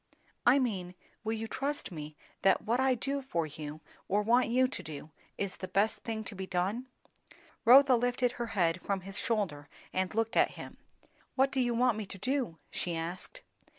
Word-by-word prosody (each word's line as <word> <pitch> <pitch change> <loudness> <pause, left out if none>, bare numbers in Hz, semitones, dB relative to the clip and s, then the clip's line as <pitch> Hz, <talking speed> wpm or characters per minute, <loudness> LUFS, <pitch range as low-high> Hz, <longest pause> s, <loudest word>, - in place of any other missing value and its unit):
"I 250 +3 +8
mean, 190 -9 -1 0.3
will 220 0 -1
you 225 0 -3
trust 280 -1 -3
me 155 -2 -7 0.3
that 195 - +4
what 235 +3 +1
I 265 -1 +4
do 275 +4 -2
for 170 -11 -1
you, 150 0 -7 0.3
or 205 +2 +2
want 240 +4 +4
you 255 +2 +3
to 255 - -6
do, 155 0 -8 0.3
is 200 -2 -3
the 185 - -5
best 205 +4 +2
thing 220 -1 -3
to 215 - -7
be 190 -1 -5
done?" 195 +8 -1 0.8
Rotha 265 +2 +8
lifted 245 +1 +1
her 240 -1 -4
head 170 0 +2
from 195 -1 -1
his 195 +2 -5
shoulder 175 -11 -1 0.2
and 185 +2 -1
looked 225 +1 0
at - - +4
him. - - -9 0.6
"What 270 0 +3
do 265 - +1
you 240 -1 +1
want 240 -2 +3
me 210 - -5
to 195 - -7
do?" 245 -4 -1
she 175 -2 -2
asked. 175 - -5
220 Hz, 190 wpm, -31 LUFS, 180-250 Hz, 0.8 s, I